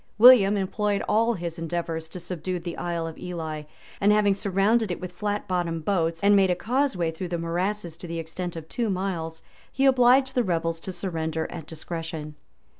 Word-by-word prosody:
William 215 -4 +8
employed 200 +1 0
all 230 +2 +3
his 170 -2 -5
endeavors 165 -1 -3
to 180 - -8
subdue 180 +1 -3
the 175 0 -5
Isle 170 -1 -2
of 165 -1 -7
Ely; 160 -4 -5 0.3
and 205 +1 +4
having 210 -1 +4
surrounded 200 +3 +1
it 175 - -3
with 185 - -6
flat 205 -1 -3
bottomed 170 -4 -1
boats, 165 -4 0
and 205 0 +6
made 195 -1 +4
a 180 - +2
causeway 220 - 0
through 170 +3 -5
the 170 0 -2
morasses 175 +2 -2
to 175 - -9
the 170 0 -4
extent 165 +2 -5
of 160 -1 -7
two 235 +3 -2
miles, 175 -4 -3 0.3
he 270 - +1
obliged 260 0 +5
the 250 - +3
rebels 165 -3 -1
to 190 - -5
surrender 160 -3 -2
at 160 -3 -7
discretion. 160 -1 -6
180 Hz, 190 wpm, -26 LUFS, 165-205 Hz, 0.3 s, William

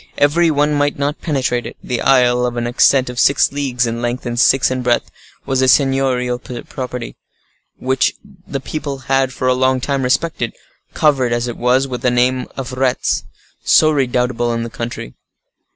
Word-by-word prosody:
Every 165 +4 +3
one 150 0 +1
might 145 0 0
not 145 +2 -2
penetrate 130 -6 -1
it: - - -10
the 125 - -3
isle, 125 -2 +3
of 120 0 -5
an 120 - -1
extent 130 +2 +3
of 125 0 -5
six 140 - +3
leagues 135 -4 -1
in 115 0 -3
length, 120 +2 -3
and 120 0 -3
six 130 +1 +4
in 130 0 -2
breadth, 120 -1 0 0.3
was 130 -1 0
a 130 - +3
seignorial 130 -2 +2
property, 125 0 -7 0.6
which 130 +1 0 0.3
the 135 - -3
people 140 0 -5
had 135 -1 +2
for 130 -1 -3
a 130 - +4
long 130 0 +1
time 140 +1 -1
respected, 130 -1 -1 0.4
covered 135 -6 +2
as 120 +1 -1
it 120 - -4
was 125 +2 +1
with 125 -2 -5
the 125 - +2
name 125 +1 +1
of 130 -2 -5
Retz, 130 -1 0 0.4
so 155 - +5
redoubtable 125 -3 0
in 115 0 -2
the 115 - -7
country. 115 - -6
130 Hz, 180 wpm, -17 LUFS, 125-135 Hz, 0.6 s, so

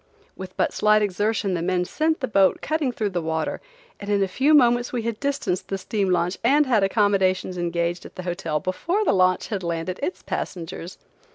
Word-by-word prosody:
With 185 -1 -9
but - - +1
slight 215 0 +3
exertion 205 +1 0
the 170 - -1
men 180 +1 0
sent 315 - 0
the 260 - -1
boat 195 -4 +3
cutting 310 -4 -1
through 215 -4 -2
the 175 -2 -1
water, 160 -1 -2 0.4
and 200 - -7
in 200 -1 +2
a - - 0
few 275 +11 +3
moments 240 -3 +4
we 240 -3 -2
had 230 -1 -3
distanced 275 -10 -2
the 195 - -2
steam 195 0 -1
launch 180 +1 0
and 285 +5 +4
had 230 -6 +2
accommodations 195 -2 +1
engaged 170 0 -2
at - - -12
the 185 - -6
hotel 175 -3 -2
before 340 - -1
the - - +3
launch 185 -1 +2
had 205 -4 -2
landed 170 +1 -3
its 360 - -3
passengers. 175 0 -5
195 Hz, 200 wpm, -23 LUFS, 180-235 Hz, 0.4 s, moments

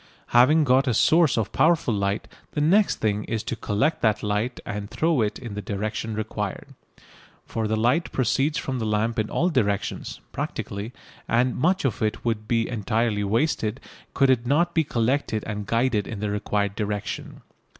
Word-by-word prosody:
Having 135 +6 +5
got 135 0 +3
a 120 - +2
source 160 0 +4
of 110 -3 -1
powerful 160 -7 +3
light, 100 0 -1 0.3
the - - -1
next 190 +8 +4
thing 105 -1 -1
is 110 -2 -2
to - - -3
collect 115 +10 0
that 110 -2 +2
light 105 +4 -1
and 105 -1 -5
throw 160 -5 +1
it 105 -1 -1
in 120 -5 -7
the 105 - -4
direction 110 +2 -3
required. 105 -2 -4 0.7
For 110 -1 -2
the 110 - 0
light 125 +10 +1
proceeds 135 +5 +1
from 130 -2 -3
the 110 - -2
lamp 110 +2 0
in 110 - -1
all 175 - +1
directions 105 - -1
(practically), 100 +3 -4 0.4
and 125 +2 +2
much 180 +4 +1
of 135 - -1
it 110 +2 -1
would 110 -2 -1
be 115 -1 +1
entirely 110 -1 0
wasted 110 +1 0 0.4
could 135 -1 +4
it 120 -3 +2
not 170 +6 +2
be 160 - +3
collected 120 -3 0
and 105 -1 -5
guided 115 -3 +1
in 110 - -5
the 105 0 -2
required 105 -1 -1
direction. 105 0 -4
115 Hz, 175 wpm, -24 LUFS, 105-135 Hz, 0.7 s, Having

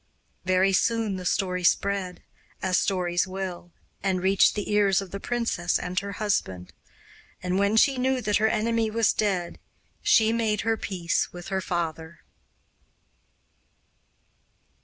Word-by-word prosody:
Very 185 +1 +3
soon 220 -1 +1
the 180 -1 -4
story 180 -2 -1
spread, 190 0 0 0.4
as 185 -1 +1
stories 180 -2 0
will, 185 -2 -6 0.3
and 190 -1 0
reached 190 +2 +3
the 210 0 -3
ears 200 -2 +3
of 195 -3 -7
the 200 - -5
princess 230 -7 -1
and 180 +1 -2
her 200 +1 -6
husband, 95 - -2 0.7
and 180 +1 0
when 200 +2 +2
she 270 +2 +4
knew 260 +1 +1
that 210 -4 +1
her 220 - +2
enemy 225 0 0
was 225 0 +2
dead 185 -5 -1 0.4
she 220 0 +4
made 220 -3 0
her 225 0 +1
peace 180 -5 -2
with 175 0 -9
her 190 -1 -1
father. 165 -2 -4
195 Hz, 140 wpm, -26 LUFS, 180-215 Hz, 0.7 s, she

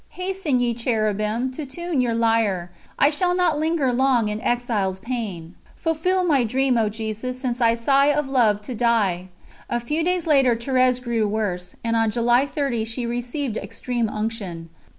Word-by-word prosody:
Hasten, 365 -8 -1
ye 240 -1 +1
Cherubim, 220 +1 -1
to 280 +4 -6
tune 310 +1 -2
your 235 -2 0
lyre; 225 -6 +1 0.3
I 285 - +4
shall 355 +4 +1
not 345 -5 +2
linger 310 -5 +1
long 250 -3 +2
in 210 +1 -4
exile's 225 -7 -1
pain!....... 200 -7 -5 0.2
Fulfill 350 +3 0
my 290 -8 +3
dream, 255 +3 +1
O 225 -2 +2
Jesus, 220 +4 -4
since 250 -2 -3
I 230 -1 +4
sigh 275 +4 +3
Of 295 -1 +1
love 225 -6 +2
to 250 - -5
die! 215 -6 +1 0.4
A 240 - 0
few 300 +7 -1
days 360 -1 0
later 270 -6 +4
Thérèse 255 +1 +2
grew 235 -3 0
worse, 190 -4 -3
and 230 0 0
on 225 -1 +2
July 240 +4 +2
30 275 -6 -1
she 230 +2 -3
received 245 +1 -3
Extreme 240 -3 -3
Unction. 210 -7 -4
240 Hz, 170 wpm, -23 LUFS, 220-275 Hz, 0.4 s, I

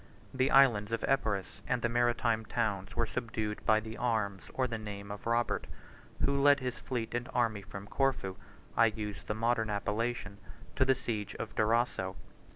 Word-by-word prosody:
The 130 +1 +2
islands 120 -7 +5
of 115 - 0
Epirus 110 -8 0
and 125 -2 0
the - - +4
maritime 120 -1 +2
towns 105 -4 -2
were 115 - +2
subdued 110 -3 -3
by 110 0 +6
the 110 +1 -7
arms 110 -5 0
or 130 - +2
the 115 -3 -3
name 100 -1 -6
of 105 +2 -7
Robert, 120 +1 +1 0.6
who 140 0 +1
led 145 0 +6
his 125 -2 -3
fleet 120 -4 -3
and 120 +1 -2
army 115 -4 +2
from 100 0 -8
Corfu 125 -5 0 0.4
(I 115 - +6
use 105 -2 -4
the 105 - -3
modern 115 0 +1
appellation) 105 +1 -2 0.4
to 130 - +4
the 135 0 +4
siege 110 -5 -3
of - - -5
Durazzo. 110 -4 +1
115 Hz, 170 wpm, -32 LUFS, 105-120 Hz, 0.6 s, by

